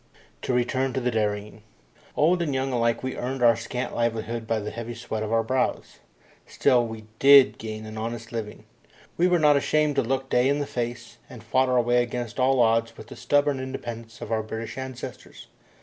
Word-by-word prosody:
To 130 - -2
return 130 +2 0
to 130 - 0
the 125 -1 -1
dairying. 105 -1 -2 0.6
Old 175 +4 +3
and 150 -5 -1
young 130 0 -1
alike 115 0 +1
we 130 - -3
earned 125 +1 -3
our 115 -1 +6
scant 125 +3 -4
livelihood 115 -1 -2
by 115 - +1
the 105 0 -5
heavy 115 0 -6
sweat 115 -2 -5
of 110 0 -3
our 115 0 +2
brows. 130 +3 -2 0.5
Still, 120 -2 +2
we 110 -1 -8
did 140 -1 +7
gain 110 -1 -6
an 110 0 -7
honest 115 +1 -5
living. 110 -3 -6 0.5
We 175 - +3
were 180 -1 +3
not 150 -3 +5
ashamed 150 0 +1
to - - +5
look 135 +2 -2
day 125 0 +2
in 140 - +2
the 145 - -2
face, 120 -1 -5
and 115 -3 -11
fought 130 +3 +2
our 125 -1 +3
way 120 +1 +3
against 120 0 -4
all 130 0 +3
odds 115 0 +2
with 110 - -11
the - - -9
stubborn 145 -1 +1
independence 120 -3 -7
of - - -7
our 110 -1 +1
British 110 +1 -6
ancestors. 130 -1 -8
120 Hz, 200 wpm, -25 LUFS, 115-130 Hz, 0.6 s, did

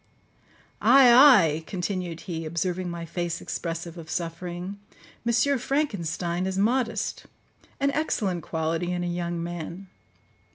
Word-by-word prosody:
—Ay, 265 -3 +7
ay," 205 - +7
continued 180 -3 -3
he, 165 -3 -5
observing 175 +3 -2
my 170 -1 -5
face 170 0 -3
expressive 170 0 -5
of 160 -1 -10
suffering, 175 +3 -4 0.4
"M. 235 +4 +2
Frankenstein 180 - -1
is 190 0 -3
modest; 230 +1 0 0.5
an 280 0 +2
excellent 210 - -1
quality 160 +2 -2
in 175 0 -2
a - - -2
young 175 -1 -3
man. 175 +2 -6
175 Hz, 120 wpm, -26 LUFS, 170-210 Hz, 0.5 s, Ay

